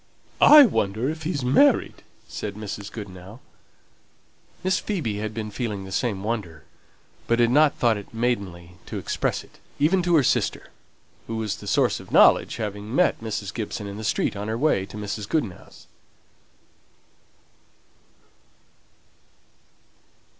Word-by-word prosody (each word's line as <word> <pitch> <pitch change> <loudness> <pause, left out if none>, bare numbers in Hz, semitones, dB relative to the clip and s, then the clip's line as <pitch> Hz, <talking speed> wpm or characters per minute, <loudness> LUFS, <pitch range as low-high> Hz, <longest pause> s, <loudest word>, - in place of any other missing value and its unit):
"I 300 0 +10
wonder 110 - 0
if 160 0 -8
he's 155 -5 -3
married!" 260 - +3 0.3
said 100 -1 -6
Mrs. 105 -1 -7
Goodenough. 100 0 -9 1.2
Miss 185 0 +1
Phoebe 150 - -3
had 110 0 -3
been 110 -1 -5
feeling 105 -4 -4
the 95 - -10
same 100 -1 -1
wonder, 105 -8 -4 0.6
but 115 - +2
had 120 0 +3
not 150 +2 +4
thought 115 -3 +2
it 100 - -10
maidenly 100 -7 -3
to - - -5
express - - -2
it, - - -21 0.2
even 175 +6 +3
to 175 -1 +2
her 150 - +5
sister, - - 0 0.6
who 115 - -4
was 110 -2 -2
the - - -11
source - - +2
of - - -13
knowledge, - - +5
having 105 +2 -5
met 180 -7 +2
Mrs. 110 -2 -4
Gibson 110 -2 -5
in 100 0 -7
the 110 - -7
street 105 - 0
on 100 +1 -5
her 110 +1 -2
way 120 -8 +1
to 105 - -10
Mrs. 105 0 -5
Goodenough's. 115 - -4
110 Hz, 140 wpm, -24 LUFS, 100-130 Hz, 1.2 s, I